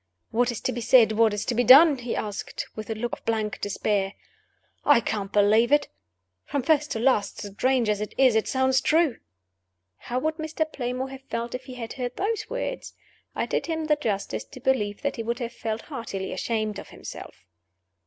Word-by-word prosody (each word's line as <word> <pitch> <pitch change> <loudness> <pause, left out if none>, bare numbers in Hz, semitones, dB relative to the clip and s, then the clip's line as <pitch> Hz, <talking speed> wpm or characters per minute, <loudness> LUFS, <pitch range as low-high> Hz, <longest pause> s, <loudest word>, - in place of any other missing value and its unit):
"What 240 +2 +2
is 235 - -6
to - - 0
be 240 0 -4
said? 225 -1 +6
what 220 0 +4
is 205 0 -3
to 250 - -1
be 245 +2 +2
done?" 280 +4 +8
he 245 -1 -3
asked, 205 -1 -4
with 215 0 -7
a 225 - -2
look 240 +2 -3
of - - -6
blank 220 -2 -2
despair. 205 -1 -1 0.7
"I 290 -5 +6
can't 205 -3 -3
disbelieve 215 +4 +4
it. 295 -1 +3 0.5
From 280 -3 -2
first 300 +1 +2
to 225 - -3
last, 225 -6 +1
strange 235 +4 +1
as 210 -1 0
it 210 - -5
is, 260 -3 +5
it 220 - +2
sounds 260 0 +2
true." 320 -4 +2 0.8
(How 245 - -4
would 315 +4 -1
Mr. 315 0 -2
Playmore 255 -3 -4
have 270 0 -9
felt 235 +1 -3
if 255 0 -5
he 255 -1 -9
had 230 -2 -6
heard 250 -2 -4
those 425 +2 -2
words? - - -4 0.4
I - - 0
did - - -2
him 320 -1 -2
the 305 -1 +3
justice 215 -9 -2
to 260 - -13
believe 215 -6 0
that 280 - -1
he - - -2
would 235 +1 -2
have 240 -2 -5
felt 225 -1 -4
heartily 230 -9 -5
ashamed 215 -3 -2
of - - -10
himself.) - - -10
240 Hz, 205 wpm, -26 LUFS, 215-270 Hz, 0.8 s, done